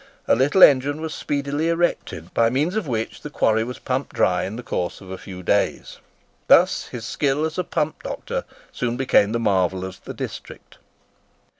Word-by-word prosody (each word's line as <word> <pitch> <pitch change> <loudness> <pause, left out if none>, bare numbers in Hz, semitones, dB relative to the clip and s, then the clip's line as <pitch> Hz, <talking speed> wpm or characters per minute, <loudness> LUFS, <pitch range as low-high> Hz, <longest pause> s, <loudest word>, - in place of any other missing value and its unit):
A - - +5
little 145 +10 +4
engine 145 +2 +5
was 160 -1 -4
speedily 145 +2 -2
erected, 165 - -1
by 115 0 +3
means 150 - 0
of 215 -7 -1
which 115 -3 -3
the 150 - -7
quarry 110 -6 +2
was 125 +2 -6
pumped 130 +2 -3
dry 90 -1 +2
in 100 - -5
the 120 - -7
course 90 -6 -3
of 95 -1 -11
a 95 - -5
few 90 -1 -9
days. - - 0 0.5
Thus - - +5
his 115 -3 -7
skill 145 +4 0
as 160 +2 -4
a - - +1
pump 155 -2 -2
doctor - - -4 0.3
soon 120 -1 -2
became 125 -5 +3
the 115 - 0
marvel 95 -4 +1
of 95 0 -9
the - - -8
district. - - -8
125 Hz, 185 wpm, -22 LUFS, 100-150 Hz, 0.5 s, A